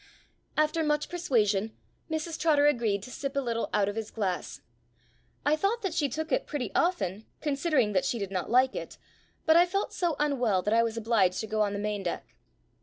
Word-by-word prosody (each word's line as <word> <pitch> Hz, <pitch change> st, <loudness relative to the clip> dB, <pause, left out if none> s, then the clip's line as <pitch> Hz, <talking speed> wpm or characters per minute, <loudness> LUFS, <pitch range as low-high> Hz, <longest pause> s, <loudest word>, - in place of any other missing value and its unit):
After 305 Hz, +1 st, +2 dB
much 300 Hz, -1 st, 0 dB
persuasion, 225 Hz, -, 0 dB, 0.3 s
Mrs 315 Hz, +1 st, -3 dB
Trotter 295 Hz, -3 st, +4 dB
agreed 230 Hz, -8 st, +2 dB
to 255 Hz, -, -9 dB
sip 275 Hz, +1 st, -4 dB
a -, -, +2 dB
little 235 Hz, -3 st, -2 dB
out 200 Hz, -1 st, +2 dB
of 205 Hz, -, -3 dB
his 225 Hz, -1 st, -4 dB
glass. 190 Hz, -5 st, -3 dB, 0.8 s
I 295 Hz, -, +4 dB
thought 405 Hz, +8 st, 0 dB
that 380 Hz, -4 st, -1 dB
she 295 Hz, -4 st, +1 dB
took 315 Hz, +1 st, -4 dB
it -, -, +1 dB
pretty 290 Hz, -4 st, -3 dB
often, 210 Hz, -, 0 dB
considering 280 Hz, -6 st, +1 dB
that 185 Hz, -, +2 dB
she 240 Hz, -, 0 dB
did 200 Hz, -3 st, -4 dB
not 185 Hz, -2 st, -2 dB
like 255 Hz, +2 st, +4 dB
it, -, -, -6 dB, 0.5 s
but 320 Hz, -, +5 dB
I 345 Hz, +1 st, +6 dB
felt 395 Hz, +3 st, -2 dB
so 345 Hz, -4 st, 0 dB
unwell 250 Hz, -10 st, +1 dB
that 210 Hz, -, +1 dB
I 230 Hz, -, +5 dB
was 230 Hz, -1 st, -1 dB
obliged 215 Hz, -5 st, +2 dB
to -, -, -4 dB
go 215 Hz, 0 st, -1 dB
on 205 Hz, -1 st, +1 dB
the -, -, -2 dB
main 205 Hz, 0 st, -2 dB
deck. 175 Hz, -3 st, -5 dB
250 Hz, 205 wpm, -28 LUFS, 210-310 Hz, 0.8 s, I